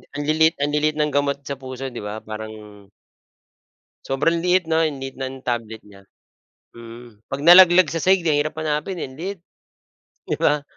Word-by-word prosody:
Ang 145 - -3
liliit 160 +1 +3
ang 145 +1 -1
liliit 150 0 +1
ng 150 -1 0
gamot 140 0 0
sa 140 -1 -6
puso 130 0 -7
'di 120 - -7
ba? 105 - -5
Parang 110 0 -6 1.5
Sobrang 145 +5 0
liit 180 0 +2
'no? 160 0 +1
Ang 155 -3 -1
liit 135 0 -7
ng 130 0 -7
tablet 115 -2 -3
niya. 100 -1 -16 0.7
Mm, 115 -1 -13
'pag 135 - -5
nalaglag 175 +1 +8
sa 165 - -2
sahig 185 +1 +2
ang 155 -3 +2
hirap 155 +1 -2
hanapin, 155 +3 -3
eh, - - -3
ang 130 - -14
liit, 190 +2 -5 0.8
'di - - -3
ba? 150 -1 +1
145 Hz, 180 wpm, -21 LUFS, 130-160 Hz, 1.5 s, nalaglag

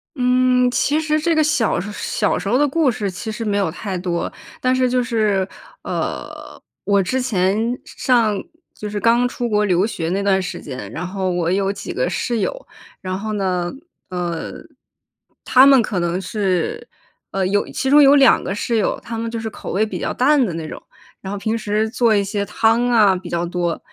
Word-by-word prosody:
嗯， 250 0 +3
其 295 +4 +1
实 310 -1 0
这 330 +1 +1
个 310 - +4
小 295 - +1
时 205 +3 -5
小 210 0 -1
时 - - -6
候 250 - +3
的 290 +1 +3
故 300 -1 +2
事 205 -3 -3
其 220 +4 -6
实 225 +1 -5
没 205 -1 0
有 195 -5 +1
太 185 +2 -5
多。 175 -1 -2 0.3
但 255 0 +2
是 255 -1 +2
就 250 0 +1
是， 210 -5 +1 0.4
呃， - - -5 0.3
我 200 -1 +3
之 255 +7 -1
前 220 +2 0
上 225 -6 +1 0.3
就 210 - -7
是 205 0 -3
刚 235 +2 +3
出 245 -1 -3
国 210 0 +2
留 185 0 +2
学 165 -7 -3
那 195 +2 -1
段 190 -1 +2
时 185 - -5
间， 125 -7 -7
然 180 - -5
后 190 0 -2
我 175 -1 0
有 195 0 +1
几 200 - -6
个 - - 0
室 235 -3 -1
友。 - - -3 0.4
然 185 -1 -3
后 215 +1 -4
呢， 180 -3 -1 0.4
呃， 175 -2 -4 0.9
她 260 +1 +6
们 270 -3 +7
可 200 -4 -2
能 175 +1 -1
是， 210 - -2 0.4
呃， 195 -1 0
有 205 +2 +1
其 265 - -2
中 295 +1 +7
有 280 +1 +7
两 270 -3 +5
个 195 - -3
室 230 +2 -1
友， 210 - 0
她 230 -1 -6
们 230 0 -3
就 230 0 -4
是 220 0 -4
口 - - -8
味 210 +3 +1
比 215 - -5
较 - - -2
淡 275 +1 +3
的 190 - -2
那 160 -1 -5
种， - - -8 0.4
然 190 - -6
后 205 - -3
平 220 +3 -1
时 215 0 0
做 230 -2 +2
一 200 - +2
些 200 +1 -2
汤 230 +4 +2
啊 210 -5 +5
比 180 -1 -7
较 170 0 -1
多， 175 -1 -2
210 Hz, 225 characters per minute, -20 LUFS, 190-245 Hz, 0.9 s, 们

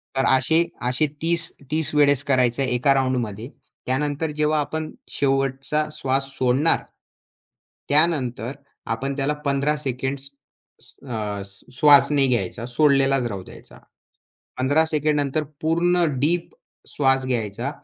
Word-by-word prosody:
तर 135 - +1
असे, 160 +6 +2 0.2
असे 125 +5 +2 0.2
30 165 0 0 0.2
30 160 0 -1
वेळेस 145 -2 +4
करायचं 130 -3 +1
आहे 130 - -1
1का 130 +3 +3
राउंडमध्ये. 125 -4 -1 0.4
त्यानंतर 145 +4 -1
जेव्हा 150 0 +2
आपण 155 +2 -3 0.2
शेवटचा 135 +2 0
श्वास 135 -2 -1
सोडणार. 130 +5 +2 1.1
त्यानंतर 135 -7 +1 0.4
आपण 135 +4 -3
त्याला 140 +2 0
15 140 +2 +1
सेकंड्स 135 0 -4 0.8
अ, 105 -4 -3 0.3
श्वास 145 +2 +6
नाही 140 -2 +3
घ्यायचा. 115 -2 -1
सोडलेलाच 135 0 +2
राहू 100 -5 -6
द्यायचा. - - -14 0.8
15 145 +5 +2
सेकंड 155 -1 0
नंतर 145 +2 -1 0.2
पूर्ण 175 +2 +2 0.2
डीप 170 - 0 0.3
श्वास 135 -2 +1
घ्यायचा 120 0 -2
135 Hz, 120 wpm, -23 LUFS, 130-150 Hz, 1.1 s, श्वास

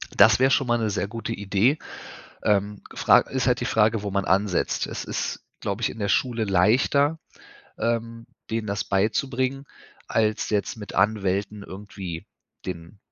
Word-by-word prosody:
Das 105 +2 +6
wäre 130 +1 +4
schon 135 -2 +2
mal 120 - +3
'ne 110 -2 0
sehr 100 - -1
gute 115 +2 -4
Idee. 105 +7 +2 0.7
Ähm, 105 0 +1
Fra - - +6
ist 130 -2 -2
halt 125 -1 +3
die - - -1
Frage, 110 -3 +2
wo 100 - -3
man 100 0 0
ansetzt. 95 -1 +1
Es - - -5
ist, - - -3 0.2
glaube, 100 +3 -3
ich - - +1
in 115 - -9
der 100 - -1
Schule 115 +1 +1
leichter, 130 - +3 0.6
ähm, 115 0 -2 0.2
denen 110 -1 -2
das 100 +1 -2
beizubringen, 130 +6 0 0.4
als 110 -1 +1
jetzt 105 0 0
mit 105 -2 -9
Anwälten 100 0 0
irgendwie 95 -4 -7 0.4
den 85 +2 -7
105 Hz, 160 wpm, -25 LUFS, 100-115 Hz, 0.7 s, Das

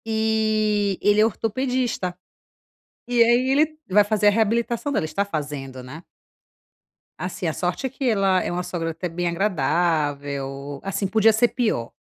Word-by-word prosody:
E 215 -2 +1
ele 205 +1 +4
é - - +6
ortopedista. 230 -4 -2 0.9
E 245 -1 +2
aí, 240 +3 +3
ele 310 +3 +2
vai 205 +2 +5
fazer 210 0 +1
a - - +9
reabilitação 230 +5 0
dela, 260 - 0
está 200 +5 -1
fazendo, 145 -7 -5
né. 140 +6 -9 1.2
Assim, - - -5
a - - -1
sorte - - -2
é - - -1
que 265 +2 -8
ela 195 -4 +2
é - - -3
uma 180 +1 -2
sogra 175 -2 -3
até 165 +3 -4
bem 175 +1 -3
agradável, 145 -6 -1
assim, 195 +1 -2
podia 220 +2 +4
ser 235 +2 +3
pior. 215 - -1
200 Hz, 155 wpm, -23 LUFS, 165-225 Hz, 1.2 s, a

